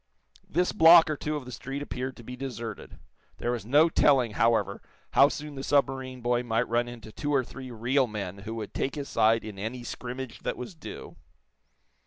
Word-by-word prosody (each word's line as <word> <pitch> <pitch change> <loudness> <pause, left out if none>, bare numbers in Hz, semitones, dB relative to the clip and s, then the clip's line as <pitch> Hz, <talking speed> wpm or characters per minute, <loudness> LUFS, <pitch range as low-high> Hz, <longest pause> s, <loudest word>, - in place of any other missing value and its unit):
This 180 +3 +1
block 165 -3 +8
or - - 0
two 150 +1 -3
of 145 -3 -5
the 125 - -8
street 135 +3 -5
appeared 130 -2 -5
to 120 - -11
be 125 +2 -7
deserted. 120 -5 -7 0.4
There 120 - -1
was 115 -4 -4
no 150 +6 +6
telling, 135 -7 +3
however, 105 -3 +1 0.3
how 140 - +6
soon 150 0 -6
the 135 - -6
submarine 135 -3 0
boy 120 0 +1
might 120 0 0
run 120 +1 +1
into 120 -2 -9
two 145 +6 -3
or 135 -3 +3
three 130 +1 -9
real 125 +3 +1
men 100 -3 -5
who 110 +3 -6
would 110 -3 -6
take 135 - -2
his 145 -2 -4
side 115 +1 +3
in 105 -3 -8
any 115 +4 -4
scrimmage 125 +1 -6
that - - -3
was 125 - -7
due. 160 - -9
125 Hz, 200 wpm, -28 LUFS, 115-140 Hz, 0.4 s, block